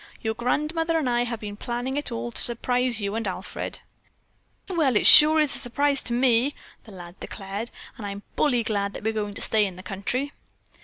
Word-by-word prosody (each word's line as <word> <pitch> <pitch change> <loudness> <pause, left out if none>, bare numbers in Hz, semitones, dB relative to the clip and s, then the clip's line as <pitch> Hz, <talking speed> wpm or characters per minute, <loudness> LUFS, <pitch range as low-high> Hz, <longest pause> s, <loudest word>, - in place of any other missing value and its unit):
"Your 220 0 -2
grandmother 305 +8 -1
and 305 -5 -1
I 240 0 +1
have 235 -2 -5
been 205 -1 -7
planning 245 +4 -4
it 290 - -2
all 120 +1 -4
to - - 0
surprise 245 0 +1
you 200 -1 -3
and 225 -1 -3
Alfred." 185 +1 -3 0.9
"Well, 315 - +1
it - - +2
sure 310 +1 +9
is 300 -3 +3
a - - +2
surprise 280 +3 0
to 240 - +1
me," 250 +2 +2 0.3
the 220 - -13
lad 175 -1 -11
declared, 200 +4 -6 0.3
"and 215 - -7
I'm 200 0 -7
bully 245 -6 +1
glad 200 -2 -2
that - - -8
we're 220 +1 -1
going 205 -2 -4
to - - -4
stay 220 -1 +2
in 190 -3 -3
the 185 - -11
country." 200 +9 -3
235 Hz, 205 wpm, -24 LUFS, 205-265 Hz, 0.9 s, sure